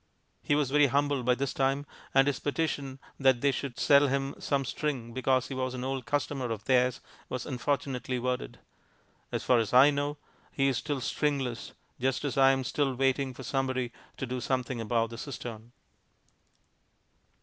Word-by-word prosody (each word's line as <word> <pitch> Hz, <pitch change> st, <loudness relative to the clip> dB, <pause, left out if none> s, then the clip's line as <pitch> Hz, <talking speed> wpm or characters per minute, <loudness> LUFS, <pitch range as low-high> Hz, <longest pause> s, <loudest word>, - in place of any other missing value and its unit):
He 145 Hz, -, +1 dB
was 145 Hz, -3 st, +1 dB
very 145 Hz, 0 st, +5 dB
humble 140 Hz, +1 st, +1 dB
by 125 Hz, 0 st, +2 dB
this 135 Hz, +1 st, -2 dB
time, 135 Hz, +1 st, +1 dB, 0.3 s
and 135 Hz, 0 st, +5 dB
his 140 Hz, -2 st, 0 dB
petition 145 Hz, -3 st, -2 dB, 0.2 s
that 130 Hz, -3 st, +4 dB
they 140 Hz, -, +4 dB
should 135 Hz, -2 st, -4 dB
sell 140 Hz, 0 st, +5 dB
him 135 Hz, +1 st, -1 dB
some 140 Hz, -2 st, 0 dB
string 130 Hz, -5 st, -3 dB
because 130 Hz, 0 st, +1 dB
he -, -, -4 dB
was 130 Hz, -1 st, -2 dB
an 125 Hz, -, -4 dB
old 130 Hz, -1 st, -3 dB
customer 145 Hz, -3 st, -1 dB
of 110 Hz, -1 st, -4 dB
theirs 125 Hz, -1 st, +2 dB, 0.3 s
was 125 Hz, -, -4 dB
unfortunately 130 Hz, -1 st, -2 dB
worded. 125 Hz, +1 st, -2 dB, 0.7 s
As -, -, -2 dB
far 125 Hz, -2 st, +4 dB
as 115 Hz, +1 st, -1 dB
I 135 Hz, +4 st, +8 dB
know 145 Hz, +1 st, -2 dB, 0.3 s
he 135 Hz, -1 st, +1 dB
is 130 Hz, -, 0 dB
still 145 Hz, -3 st, -3 dB
stringless, 135 Hz, -3 st, -1 dB, 0.3 s
just 130 Hz, +3 st, 0 dB
as 140 Hz, -, -2 dB
I 135 Hz, -1 st, +6 dB
am 135 Hz, 0 st, +2 dB
still 135 Hz, +1 st, 0 dB
waiting 135 Hz, 0 st, +1 dB
for 135 Hz, -, -8 dB
somebody 130 Hz, -2 st, -1 dB, 0.3 s
to 135 Hz, -, -3 dB
do 125 Hz, 0 st, -4 dB
something 125 Hz, -1 st, -1 dB
about 115 Hz, +1 st, 0 dB
the 115 Hz, -, -7 dB
cistern. 120 Hz, -4 st, -7 dB
135 Hz, 175 wpm, -29 LUFS, 125-140 Hz, 0.7 s, I